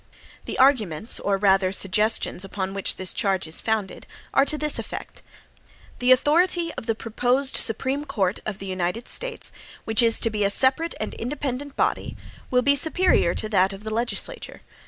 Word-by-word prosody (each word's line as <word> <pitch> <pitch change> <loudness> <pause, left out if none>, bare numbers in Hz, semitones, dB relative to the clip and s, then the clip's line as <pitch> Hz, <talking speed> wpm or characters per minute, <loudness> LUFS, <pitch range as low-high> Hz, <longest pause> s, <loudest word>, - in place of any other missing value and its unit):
The - - -6
arguments, 225 - +2
or 200 0 -1
rather 190 -1 +2
suggestions, 200 0 +1
upon 195 0 -5
which 195 -1 -1
this 185 -1 -1
charge 190 -3 -1
is 160 - -2
founded, 215 -4 -3 0.3
are 275 - +4
to 305 - -1
this 300 0 -1
effect: - - -8 0.8
"The 250 +1 +2
authority 335 +6 +2
of - - -9
the 225 - 0
proposed 245 +5 0
Supreme 265 +6 +2
Court 195 -7 -2
of 210 -2 -5
the 195 - -9
United 185 +4 -3
States, - - +2 0.3
which 225 +2 +3
is 230 -1 +5
to 225 - +1
be 210 -1 -2
a 200 - +2
separate 265 +10 +3
and 215 - -5
independent 275 +2 -5
body, - - -2 0.3
will 250 0 +1
be 280 +2 +3
superior 320 - +2
to 215 - -3
that 195 -2 +2
of 195 +2 -11
the 220 0 -5
legislature. 240 - -4
225 Hz, 175 wpm, -23 LUFS, 195-275 Hz, 0.8 s, is